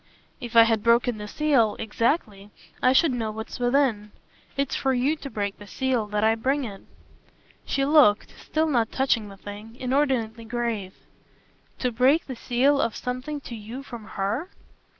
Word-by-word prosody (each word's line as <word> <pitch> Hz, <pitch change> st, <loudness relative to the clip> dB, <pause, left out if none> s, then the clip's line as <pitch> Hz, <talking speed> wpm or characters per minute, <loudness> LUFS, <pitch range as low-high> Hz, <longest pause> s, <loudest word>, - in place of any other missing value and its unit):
"If 235 Hz, -1 st, -8 dB
I 230 Hz, -, +10 dB
had 225 Hz, -2 st, +1 dB
broken 235 Hz, 0 st, +3 dB
the 210 Hz, -, -6 dB
seal 255 Hz, -5 st, +2 dB
exactly 220 Hz, -2 st, -1 dB, 0.3 s
I 255 Hz, -, +5 dB
should 290 Hz, +3 st, +4 dB
know 230 Hz, -3 st, -2 dB
what's 220 Hz, +3 st, -7 dB
within. 245 Hz, -5 st, +1 dB, 0.5 s
It's 275 Hz, -1 st, 0 dB
for 265 Hz, -1 st, +1 dB
YOU 265 Hz, +5 st, +1 dB
to 280 Hz, -, -8 dB
break 200 Hz, -4 st, -3 dB
the 205 Hz, -, -11 dB
seal 255 Hz, -2 st, -1 dB
that 210 Hz, 0 st, -1 dB
I 220 Hz, 0 st, +5 dB
bring 270 Hz, +5 st, 0 dB
it." 200 Hz, -5 st, -7 dB, 0.9 s
She 275 Hz, -, +1 dB
looked 280 Hz, -8 st, +4 dB
still 315 Hz, +1 st, 0 dB
not 240 Hz, -7 st, +1 dB
touching 240 Hz, -5 st, +1 dB
the 195 Hz, -, -12 dB
thing 205 Hz, +3 st, -10 dB
inordinately 250 Hz, -4 st, 0 dB
grave. 225 Hz, -5 st, -3 dB, 0.8 s
"To 250 Hz, -, -1 dB
break 260 Hz, +7 st, +3 dB
the 260 Hz, -, -6 dB
seal 260 Hz, +5 st, +2 dB
of 225 Hz, -, -1 dB
something 255 Hz, +4 st, -4 dB
to 245 Hz, -, -9 dB
you 225 Hz, +5 st, -8 dB
from 235 Hz, -5 st, -9 dB
HER?" 215 Hz, -, -1 dB
240 Hz, 170 wpm, -25 LUFS, 215-270 Hz, 0.9 s, I